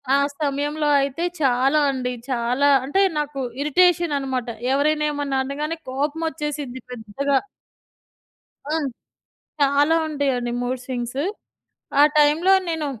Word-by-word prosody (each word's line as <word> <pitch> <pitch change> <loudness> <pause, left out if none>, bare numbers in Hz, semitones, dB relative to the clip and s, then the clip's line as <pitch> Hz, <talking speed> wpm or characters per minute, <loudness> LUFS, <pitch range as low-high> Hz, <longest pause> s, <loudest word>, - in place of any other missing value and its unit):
ఆ - - +5 0.2
సమయంలో 295 +1 -1
అయితే 275 +4 -2 0.2
చాలా 270 +2 +3
అండి. 250 -2 -3 0.2
చాలా 250 +3 +2 0.2
అంటే 335 +9 +1 0.2
నాకు 295 -2 -3 0.2
ఇరిటేషన్ 345 +1 +3
అనమాట. 260 -3 -3 0.3
ఎవరైనా 300 +2 +2
ఏమన్నా 285 -2 -1
అనగానే 300 +4 -3
కోపం 290 +4 -2
వచ్చేసిద్ది 295 -5 -5
పెద్దగా. 250 +4 -1 1.3
హ్మ్. 310 -2 0 0.7
చాలా 285 +3 +4
ఉంటాయండి 270 -5 -1
మూడ్ 250 +1 -2
స్వింగ్స్. 250 +1 -3 0.8
ఆ - - +9 0.2
టైమ్‌లో 305 +6 +4 0.2
నేను 320 -2 -2
285 Hz, 110 wpm, -22 LUFS, 260-300 Hz, 1.3 s, ఆ